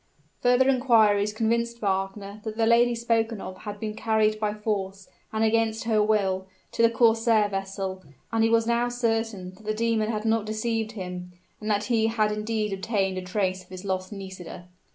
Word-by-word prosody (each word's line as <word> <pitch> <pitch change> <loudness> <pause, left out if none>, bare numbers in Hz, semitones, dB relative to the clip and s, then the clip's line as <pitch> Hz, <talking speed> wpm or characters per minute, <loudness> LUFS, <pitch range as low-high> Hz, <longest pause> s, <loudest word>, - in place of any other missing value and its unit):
Further 250 +1 +4
inquiries 220 -6 +4
convinced 235 +2 0
Wagner 200 0 -2
that 220 -1 -5
the 225 - +3
lady 235 +1 +4
spoken 230 -1 0
of 185 - -7
had 205 -1 -7
been 215 0 -3
carried 215 -1 +1
by 210 -1 0
force, 200 -2 -3 0.2
and 220 0 0
against 225 0 +1
her 220 -2 +2
will, 195 -3 +1 0.2
to - - -1
the 230 - +6
corsair 225 -2 +3
vessel; 195 -1 -4 0.3
and 225 -1 +2
he 225 - +4
was 230 0 +3
now 235 +1 +1
certain 225 -6 -1
that 190 - -17
the 215 0 -2
demon 225 -1 +1
had 215 0 -3
not 225 -1 +2
deceived 220 0 -2
him, 180 -3 -6 0.3
and 215 - -5
that 205 0 +1
he 225 -1 +2
had 215 -2 +1
indeed 210 -1 -2
obtained 195 -1 -1
a - - -6
trace 185 0 -1
of - - -26
his 185 +1 -9
lost 185 0 -2
Nisida! 190 -3 -9
215 Hz, 185 wpm, -26 LUFS, 195-225 Hz, 0.3 s, the